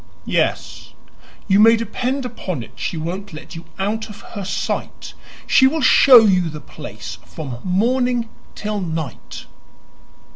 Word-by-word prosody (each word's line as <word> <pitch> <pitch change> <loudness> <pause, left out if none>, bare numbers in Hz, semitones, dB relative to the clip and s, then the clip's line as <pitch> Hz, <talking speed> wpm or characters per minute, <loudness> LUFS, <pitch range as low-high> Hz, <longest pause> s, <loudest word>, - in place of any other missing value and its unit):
"Yes, - - -2 0.5
you 195 0 +4
may 225 +2 +7
depend 250 +4 -2
upon 185 - -5
it - - -13
she 170 - -4
won't 180 +4 -5
let 155 +3 -10
you 165 - -9
out 220 +3 -2
of 205 -1 -11
her 205 -3 -5
sight. 190 - -4 0.3
She 265 - +5
will 315 +4 0
show 255 -2 +8
you 185 -4 +2
the 155 0 -7
place 105 - -9
from 120 - -7
morning 240 +5 +1 0.3
till 210 -1 -3
night." 160 - -5
195 Hz, 140 wpm, -20 LUFS, 160-230 Hz, 0.5 s, show